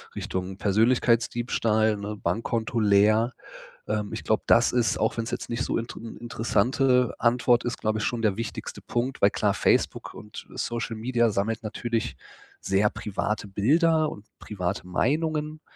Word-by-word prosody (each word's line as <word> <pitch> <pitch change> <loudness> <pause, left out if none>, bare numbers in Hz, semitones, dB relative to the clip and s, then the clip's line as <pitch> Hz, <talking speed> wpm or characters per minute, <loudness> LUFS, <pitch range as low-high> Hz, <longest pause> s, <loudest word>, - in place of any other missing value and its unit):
Richtung 95 +1 -4
Persönlichkeitsdiebstahl, 115 0 +2
ne, 105 +1 -5
Bankkonto 115 +5 -1
leer. 110 +3 +4 0.5
Ähm, 105 -1 -2
ich 110 - -5
glaube, 110 - +1
das 120 - +5
ist, 120 -2 +1
auch 110 +2 0
wenn 115 - 0
es - - -6
jetzt - - -4
nicht 120 +1 -1
so - - -1
inter 115 0 -5
'ne 115 0 -9
interessante 125 +3 +1
Antwort 120 0 +3
ist, 120 0 -3
glaube 110 0 0
ich - - -2
schon 120 -2 -1
der 105 -2 +1
wichtigste 115 -2 -5
Punkt, 125 +3 -3
weil 100 - +6
klar, - - +1
Facebook - - +1
und 105 - -10
Social 120 0 -3
Media 120 +1 +1
sammelt 110 +2 -1
natürlich 115 +1 -3 0.4
sehr 100 +2 +2
private 105 0 -3
Bilder 155 - +2
und 105 - -10
private 90 -3 -4
Meinungen. 155 - -1
115 Hz, 155 wpm, -26 LUFS, 105-120 Hz, 0.5 s, weil